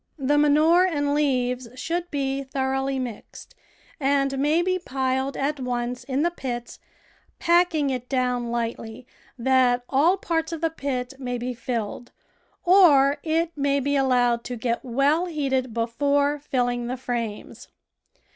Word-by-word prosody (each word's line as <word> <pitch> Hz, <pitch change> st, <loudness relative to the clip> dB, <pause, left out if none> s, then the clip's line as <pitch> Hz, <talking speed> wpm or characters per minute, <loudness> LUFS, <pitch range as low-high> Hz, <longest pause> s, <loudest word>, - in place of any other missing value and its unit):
The 290 Hz, +1 st, +2 dB
manure 305 Hz, +4 st, +5 dB
and 290 Hz, -6 st, 0 dB
leaves 255 Hz, -4 st, 0 dB
should 340 Hz, +6 st, -3 dB
be 275 Hz, -2 st, -2 dB
thoroughly 270 Hz, 0 st, -1 dB
mixed, 245 Hz, -4 st, -7 dB, 0.5 s
and 275 Hz, -1 st, +1 dB
may 305 Hz, +5 st, +2 dB
be 370 Hz, 0 st, 0 dB
piled 265 Hz, -2 st, -2 dB
at 285 Hz, +1 st, -1 dB
once 245 Hz, 0 st, -3 dB
in 270 Hz, +2 st, -1 dB
the 345 Hz, -, +1 dB
pits, 245 Hz, -7 st, -6 dB, 0.6 s
pack 350 Hz, 0 st, +3 dB
ing 285 Hz, -3 st, +1 dB
it 250 Hz, -1 st, -5 dB
down 250 Hz, -2 st, 0 dB
lightly 230 Hz, 0 st, -4 dB, 0.3 s
that 250 Hz, -1 st, +3 dB
all 320 Hz, +8 st, +3 dB
parts 325 Hz, -3 st, -2 dB
of 330 Hz, -1 st, -5 dB
the 330 Hz, -1 st, +1 dB
pit 265 Hz, -5 st, -3 dB
may 245 Hz, -2 st, -3 dB
be 250 Hz, +1 st, -4 dB
filled, 235 Hz, -1 st, -4 dB, 0.5 s
or 295 Hz, -7 st, +6 dB
it 330 Hz, +1 st, 0 dB
may 280 Hz, -1 st, +1 dB
be 285 Hz, +1 st, 0 dB
allowed 245 Hz, -3 st, +2 dB
to 250 Hz, -, -4 dB
get 235 Hz, 0 st, -2 dB
well 280 Hz, +7 st, +1 dB
heated 270 Hz, -6 st, -1 dB
before 280 Hz, +6 st, 0 dB
filling 245 Hz, -4 st, -1 dB
the 255 Hz, +2 st, -3 dB
frames. 235 Hz, -4 st, -5 dB
270 Hz, 145 wpm, -24 LUFS, 245-295 Hz, 0.6 s, or